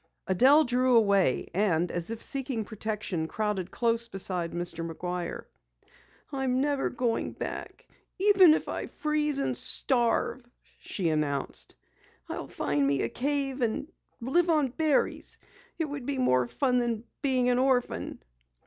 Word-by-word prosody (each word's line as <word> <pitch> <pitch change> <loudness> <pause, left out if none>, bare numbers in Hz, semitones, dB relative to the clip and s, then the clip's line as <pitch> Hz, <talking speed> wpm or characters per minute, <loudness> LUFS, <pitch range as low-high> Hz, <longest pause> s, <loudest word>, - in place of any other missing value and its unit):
Adelle 265 - +5
drew 250 0 +2
away, 200 - +3
and 180 -3 +1
as 175 +1 -2
if 230 0 -4
seeking 265 -5 -1
protection, 210 -6 -3
crowded 210 -2 -2
close 230 +1 0
beside 185 -5 -1
Mr. 175 -1 -4
McGuire. 175 +1 -4 0.9
"I'm 265 -2 0
never 285 0 0
going 240 -2 -1
back, - - -7 0.3
even 380 -5 +6
if - - -4
I - - -4
freeze 300 -1 -1
and 275 - 0
starve!" 245 0 +2 0.4
she 180 -5 -2
announced. 150 -3 -2 0.5
"I'll - - -5
find 145 -1 0
me 140 -1 +1
a 115 - -1
cave 275 - -1
and 235 +6 -1 0.3
live 335 +9 +1
on 305 -5 +3
berries. 300 +2 0 0.4
It 325 - 0
would 285 -4 -6
be 285 -1 -1
more 130 - +2
fun 250 - +1
than 235 -2 -1 0.2
being 255 -3 +2
an 245 0 +2
orphan." 260 -2 0
240 Hz, 140 wpm, -28 LUFS, 185-275 Hz, 0.9 s, even